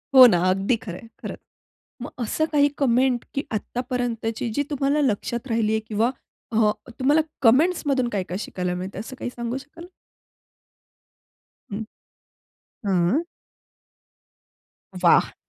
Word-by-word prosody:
हो 260 -1 +12
ना. 205 - +4
अगदी 195 +6 +2
खरंय, 210 +2 -8
खर. - - -5 0.7
मग - - -5
असं 260 +6 0
काही 290 -1 +5
कमेंट 255 -2 +2
की 275 - 0
आत्तापर्यंतची 240 0 -2
जी 285 - +2
तुम्हाला 285 +1 +1
लक्षात 235 -1 -1
राहिली 225 -2 +1
आहे. 220 - +1
किंवा 220 +3 +1 0.4
हां 215 -1 +4 0.3
तुम्हाला 290 +4 +4 0.2
कमेंटस 300 +10 +4
मधून 265 -3 +2
काय-काय 190 -4 -3
शिकायला 180 -4 -3
मिळतंय? 185 +2 -5
असं 245 +5 -8
काही - - -4
सांगू 235 +1 -3
शकाल? 300 +5 -10 1.9
हं. 205 +2 -3 1.0
हां. 190 - +2 1.8
वाह! - - +5
235 Hz, 120 wpm, -24 LUFS, 210-270 Hz, 1.9 s, हो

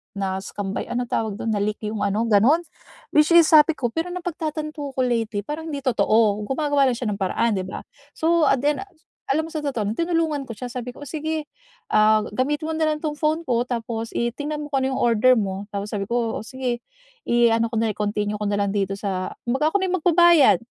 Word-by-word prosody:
na 190 -1 -2
scam 200 -1 -5
ba? - - -2
Ay - - -10
ano 245 0 -1
tawag 220 -3 -1
do'n? 225 - -2
Na-leak 210 +1 -1
'yong 210 -1 -3
ano, 205 +3 0
gano'n. 230 +9 +5 0.6
Which 300 +2 +5
is 340 -2 +7
sabi 310 0 +7
ko 245 - -1
pero 340 +2 -2
napagtatanto 310 -4 -4
ko - - -4
lately 230 -4 0
parang 315 +4 -5
hindi 285 - -3
totoo, 215 -4 +2
gumagawa 285 0 +1
lang 240 - -3
siya 245 - -3
ng - - -2
paraan, 215 +3 +1
'di 185 - -2
ba. - - -6 0.3
So 330 0 +2
at 270 - +3
the 295 +1 +3
end - - -6 0.5
alam 315 +3 0
mo - - -12
sa 310 -2 -3
totoo 240 -8 -2
lang, - - -4
tinulungan 330 -4 0
ko - - -3
siya, 250 +3 -6
sabi 250 0 -5
ko, 265 - -12
"Oh, - - -9
sige, 315 -1 -3 0.5
ah, 215 0 +5
gamitin 295 +5 -1
mo - - -2
na 315 -1 +1
lang 300 - -3
'tong 300 -1 -2
phone 310 +1 +1
ko 240 -1 +2
tapos 230 -1 -4
i 235 0 0
tingnan 295 +1 -4
mo 295 - -6
kung 270 -2 +1
ano 265 0 0
'yong - - -2
order 240 +2 +4
mo," 195 -1 -3
tapos 200 +1 -3
sabi 200 - -1
ko, 235 -1 -1
"oh, - - -15
sige 250 -2 -3 0.4
i-ano 230 -1 +3
ko 230 - -2
na, 225 -1 +1
i-continue 210 0 -1
ko 210 - -3
na 205 - 0
lang 200 -1 0
dito 195 -1 0
sa" 185 -2 -3 0.2
Kumbaga 280 +6 +1
ako 405 - +3
na - - +1
yung - - +2
magbabayad. 345 -4 +6
250 Hz, 235 wpm, -23 LUFS, 215-305 Hz, 0.6 s, is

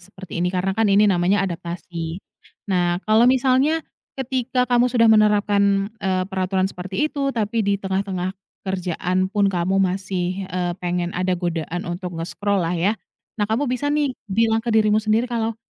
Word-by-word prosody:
seperti 185 -1 -8
ini, 180 - +2
karena 185 +1 -1
kan 220 -1 +2
ini 200 +1 +5
namanya 190 +1 +2
adaptasi. 170 -1 -5 0.5
Nah, 175 -3 +1
kalau 220 +3 +5
misalnya, 265 +5 +2 0.3
ketika 255 -1 0
kamu 245 0 +3
sudah 240 -2 +3
menerapkan, 205 -1 +3
eee, 185 -1 0
peraturan 190 0 -1
seperti 190 +11 -2
itu, 280 -2 -1
tapi 225 -2 -1
di 200 0 +1
tengah-tengah 190 -1 -2 0.3
kerjaan 185 0 -1
pun 205 0 +1
kamu 180 +2 0
masih, 190 0 -1
eee, 180 -1 -2
pengen 175 0 -2
ada 180 0 0
godaan 175 0 -3
untuk 175 0 -5
nge-scroll 195 +3 -1
lah 165 +1 -1
ya. 185 +5 +2 0.5
Nah 205 - +1
kamu 230 +6 +1
bisa 255 +3 -1
nih, 290 -3 +1 0.2
bilang 225 +2 +2
ke 240 - -6
dirimu 215 -1 +3
sendiri 215 +2 +2
kalau, 230 -2 -2
195 Hz, 160 wpm, -22 LUFS, 180-220 Hz, 0.5 s, ini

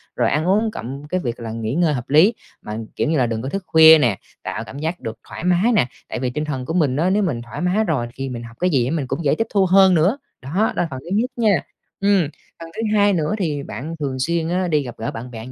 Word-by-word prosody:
rồi - - +2
ăn 155 +3 0
uống 215 +4 +2
cộng 140 - -7
cái 185 +4 -1
việc 120 -7 -4
là 115 -1 -5
nghỉ 115 0 -3
ngơi 165 0 +2
hợp 125 -2 -5
lý, 160 +10 +6 0.3
mà, 105 0 -6 0.2
kiểu - - 0
như 160 - +2
là, 130 - +3
đừng 115 -1 -3
có 130 - -4
thức 195 +5 -4
khuya 160 0 +8
nè, 120 -10 +2 0.3
tạo - - -4
cảm 140 - -9
giác 160 +4 -3
được 110 0 -7
thoải - - -7
mái 180 +6 +3
nè. 170 - +3 0.2
Tại - - -4
vì 125 0 -1
tinh 150 +5 -3
thần 135 -4 -4
của 160 - -3
mình 150 -7 +2
á 165 +6 +1
nếu 205 +2 +2
mình 140 -11 -1
thoải 120 +4 -8
mái 180 +5 +2
rồi 145 - -1
thì 135 0 -4
mình 120 -2 -6
học 115 0 -12
cái 180 - +2
gì 130 -6 +1
mình 150 -3 -2
cũng 135 +6 -3
dễ 140 - +3
tiếp 225 - 0
thu 195 -2 +4
hơn 190 0 +6
nữa. 180 - +3 0.2
Đó, 130 - -9
đó 215 +5 +2
là 175 - 0
phần 130 - -5
thứ 160 - -12
nhất 240 +4 +1
nha. 215 -6 +2 0.4
Ừm, 200 -1 +3 0.4
phần 165 0 -9
thứ - - -3
hai 205 -1 +4
nữa 160 -2 0
thì 150 -8 -2
bạn 155 +5 -6
thường 135 -3 -3
xuyên 165 +4 0
á 180 +1 0
đi 150 -4 +1
gặp 120 -3 -8
gỡ 115 - -3
bạn 125 +2 -8
bè 115 -1 -8
như 130 - -9
155 Hz, 285 wpm, -21 LUFS, 130-185 Hz, 0.4 s, khuya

